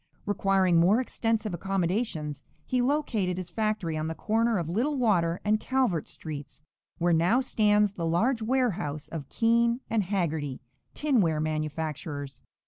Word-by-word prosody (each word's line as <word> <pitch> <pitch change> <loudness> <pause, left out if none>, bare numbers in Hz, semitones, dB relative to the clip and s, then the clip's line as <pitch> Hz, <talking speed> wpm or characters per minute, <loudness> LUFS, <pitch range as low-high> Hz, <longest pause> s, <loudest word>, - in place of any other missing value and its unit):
Requiring 195 -3 +2
more 190 +7 +4
extensive 225 -4 -1
accommodations, 180 - -2 0.2
he 250 -1 +1
located 245 -10 0
his 180 -2 -5
factory 215 -5 -1
on 155 0 -2
the 160 - -4
corner 225 +3 +1
of 170 -3 -2
Little 245 - 0
Water 180 -8 +2
and 215 +1 +3
Calvert 255 - 0
streets, 145 -2 -8 0.3
where 175 0 +2
now 175 +10 +3
stands 210 -5 +2
the 170 -4 -3
large 225 +9 +1
warehouse 215 - -1
of 150 -5 -6
Keen 235 +1 +2
& - - -19
Hagerty, 175 - -1 0.4
tinware 210 - +2
manufacturers. 155 -2 -3
190 Hz, 135 wpm, -28 LUFS, 160-225 Hz, 0.4 s, more